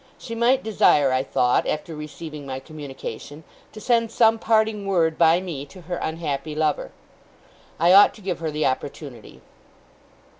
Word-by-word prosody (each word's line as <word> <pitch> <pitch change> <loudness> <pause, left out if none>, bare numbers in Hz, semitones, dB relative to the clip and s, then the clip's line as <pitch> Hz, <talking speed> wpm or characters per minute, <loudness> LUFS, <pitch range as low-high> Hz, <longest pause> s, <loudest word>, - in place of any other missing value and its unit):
She 230 - -8
might 245 +3 +2
desire, 150 -10 +3
I 130 0 +1
thought, 125 -2 +1
after 155 +1 -3
receiving 150 0 -8
my 130 -1 -5
communication, 145 -1 -9 0.3
to 215 - -11
send 230 0 +1
some 225 0 +3
parting 220 -2 +1
word 165 -4 +1
by 165 +1 +4
me 170 -7 -6
to 185 +5 -14
her 175 +1 -5
unhappy 155 -2 -4
lover. 155 -1 -1 0.9
I 170 +3 +5
ought 200 +1 +7
to 215 - -15
give 185 -3 -3
her 165 -1 -3
the 150 0 -2
opportunity. 130 -2 -5
160 Hz, 155 wpm, -23 LUFS, 145-200 Hz, 0.9 s, ought